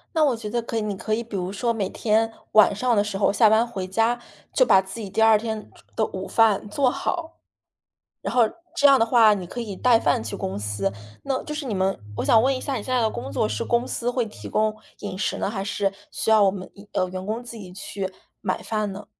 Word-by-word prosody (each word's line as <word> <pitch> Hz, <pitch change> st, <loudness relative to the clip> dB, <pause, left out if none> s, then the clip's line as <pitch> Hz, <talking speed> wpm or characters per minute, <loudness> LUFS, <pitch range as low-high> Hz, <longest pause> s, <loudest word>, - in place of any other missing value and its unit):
那 320 Hz, -, +4 dB
我 285 Hz, -4 st, +3 dB
觉 220 Hz, -2 st, -6 dB
得 235 Hz, +2 st, -1 dB
可 230 Hz, 0 st, -4 dB
以 225 Hz, -, +1 dB
你 210 Hz, -1 st, -2 dB
可 215 Hz, +3 st, -3 dB
以 225 Hz, -, 0 dB
比 230 Hz, -3 st, -8 dB
如 185 Hz, -1 st, -2 dB
说 235 Hz, +4 st, 0 dB
每 200 Hz, -4 st, -2 dB
天 225 Hz, 0 st, +1 dB, 0.2 s
晚 215 Hz, -1 st, +7 dB
上 240 Hz, +4 st, +1 dB
的 205 Hz, -, +3 dB
时 210 Hz, -2 st, -4 dB
候 195 Hz, -, +2 dB
下 220 Hz, 0 st, +5 dB
班 220 Hz, +2 st, +3 dB
回 195 Hz, -6 st, -4 dB
家 225 Hz, +6 st, +1 dB, 0.4 s
就 -, -, +4 dB
把 190 Hz, -, +6 dB
自 190 Hz, +4 st, -9 dB
己 205 Hz, -, -6 dB
第 195 Hz, -, -1 dB
二 220 Hz, -1 st, +7 dB
天 220 Hz, -1 st, -5 dB, 0.3 s
的 220 Hz, -, +3 dB
午 190 Hz, 0 st, -6 dB
饭 215 Hz, -2 st, +2 dB
做 260 Hz, +4 st, +2 dB
好。 330 Hz, +5 st, -3 dB, 0.9 s
然 -, -, -3 dB
后 245 Hz, -2 st, +5 dB, 0.3 s
这 285 Hz, -, +5 dB
样 275 Hz, -, +7 dB
的 225 Hz, -, +3 dB
话 225 Hz, -3 st, +6 dB
你 190 Hz, -3 st, -4 dB
可 210 Hz, -, -7 dB
以 215 Hz, -5 st, -5 dB
带 235 Hz, +2 st, +4 dB
饭 145 Hz, -6 st, +1 dB
去 110 Hz, -, -6 dB
公 95 Hz, +1 st, -3 dB
司， 105 Hz, -1 st, -1 dB, 0.3 s
那 270 Hz, -1 st, -2 dB
就 300 Hz, -, -5 dB
是 300 Hz, -1 st, -4 dB
你 225 Hz, -5 st, -2 dB
们， 190 Hz, -3 st, 0 dB, 0.2 s
我 -, -, -2 dB
想 225 Hz, -, +5 dB
问 265 Hz, +2 st, +2 dB
一 -, -, -7 dB
下 275 Hz, -, -2 dB
你 225 Hz, -, -3 dB
现 255 Hz, +3 st, -2 dB
在 245 Hz, -, +3 dB
的 220 Hz, -, +2 dB
工 130 Hz, -, -6 dB
作 -, -, 0 dB
是 105 Hz, -, -2 dB
公 240 Hz, +1 st, +1 dB
司 240 Hz, -, -2 dB
会 245 Hz, -1 st, 0 dB
提 215 Hz, -, -10 dB
供 215 Hz, 0 st, +1 dB, 0.3 s
饮 190 Hz, -2 st, -6 dB
食 -, -, -1 dB
呢？ -, -, -1 dB
还 200 Hz, -3 st, -3 dB
是 200 Hz, 0 st, -1 dB, 0.2 s
需 -, -, -2 dB
要 220 Hz, -, +6 dB
我 195 Hz, -, +6 dB
们， 190 Hz, -1 st, -7 dB, 0.2 s
呃， 185 Hz, -, +1 dB
员 185 Hz, 0 st, -5 dB
工 225 Hz, +4 st, -3 dB
自 235 Hz, -1 st, -9 dB
己 185 Hz, -4 st, -10 dB
去 190 Hz, 0 st, -5 dB, 0.3 s
买 -, -, -2 dB
饭 215 Hz, -2 st, -1 dB
呢？ 205 Hz, +1 st, -9 dB
215 Hz, 280 characters per minute, -24 LUFS, 195-235 Hz, 0.9 s, 晚